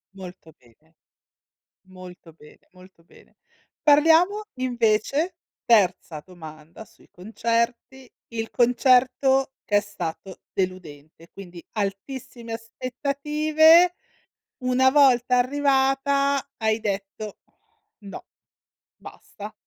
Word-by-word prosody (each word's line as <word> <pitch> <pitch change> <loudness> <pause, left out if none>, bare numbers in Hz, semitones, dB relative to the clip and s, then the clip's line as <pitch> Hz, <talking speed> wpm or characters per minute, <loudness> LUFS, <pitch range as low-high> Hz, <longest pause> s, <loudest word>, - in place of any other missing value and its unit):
Molto 180 -3 -12
bene. 150 +7 -28 0.9
Molto 180 -3 -13
bene, 150 -1 -20
molto 180 -2 -19
bene. - - -22 0.5
Parliamo 325 +8 +4
invece 255 +7 -1 0.3
terza 185 -8 +1
domanda 160 +1 -13
sui - - -24
concerti. 235 +6 -3 0.2
Il 225 -1 -5
concerto 260 +2 +2
che 205 - 0
è - - +5
stato 190 -2 -8
deludente, 165 -4 -6
quindi 180 -3 -12
altissime 230 +3 -6
aspettative. 300 +8 +2 0.7
Una 255 +1 +3
volta 255 -3 +3
arrivata, 275 +1 +1
hai 220 0 0
detto: 200 0 -5 0.6
"No. 200 -2 -11 0.7
Basta." - - -12
230 Hz, 85 wpm, -23 LUFS, 185-270 Hz, 0.9 s, è